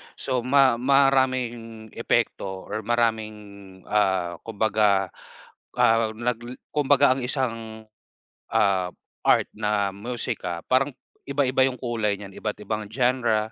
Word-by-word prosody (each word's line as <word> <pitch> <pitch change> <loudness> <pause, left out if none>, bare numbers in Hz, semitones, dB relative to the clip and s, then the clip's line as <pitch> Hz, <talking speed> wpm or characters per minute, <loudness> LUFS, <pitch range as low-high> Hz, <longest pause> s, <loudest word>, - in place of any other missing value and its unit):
So 130 -2 -1
ma 130 -1 +4
maraming 130 -4 +1
epekto - - 0 0.2
or 110 +1 -4
maraming, 110 -2 +1 0.5
ah, 95 -4 0
kumbaga, 105 -3 +2 0.6
ah, 115 0 +4
nagle 120 +1 -3 0.2
kumbaga 145 -3 +4
ang 135 - -4
isang, 115 -4 -3 0.7
ah, 95 -2 +2 0.4
art - - +4
na 105 -2 0
musika 100 -6 -4
parang 135 +3 +3 0.4
iba-iba 135 -2 +2
yung 130 - -3
kulay 115 -4 -1
niyan, 100 -1 -9
iba't 105 -1 -4
ibang 110 -1 -3
genre 120 -4 +1
115 Hz, 110 wpm, -25 LUFS, 105-130 Hz, 0.7 s, ma